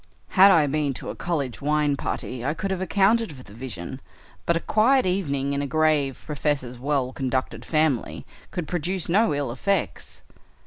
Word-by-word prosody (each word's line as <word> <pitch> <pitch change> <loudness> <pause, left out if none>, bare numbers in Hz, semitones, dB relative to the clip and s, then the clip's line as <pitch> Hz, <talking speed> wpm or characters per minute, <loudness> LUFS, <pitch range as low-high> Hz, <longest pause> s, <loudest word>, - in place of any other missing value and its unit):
Had 195 +1 +7
I 165 -6 +5
been 145 -1 -1
to - - -6
a - - -9
college 145 -9 -3
wine 150 0 +1
party 125 -2 -4
I 145 +4 -1
could 195 +4 -3
have 190 -1 -2
accounted 200 +1 +2
for 130 -2 -12
the 100 - -15
vision, 120 0 -6 0.5
but 170 - +3
a - - -1
quiet 240 +8 +3
evening 140 -7 0
in 140 - -1
a 140 - -2
grave 155 -3 +1
professor's 140 -5 -2
well 135 -1 0
conducted 130 -1 -2
family 155 -5 0 0.2
could 175 -4 -4
produce 175 +2 -2
no 185 -3 +3
ill 140 -4 -2
effects. 195 +11 -2
150 Hz, 175 wpm, -24 LUFS, 135-180 Hz, 0.5 s, Had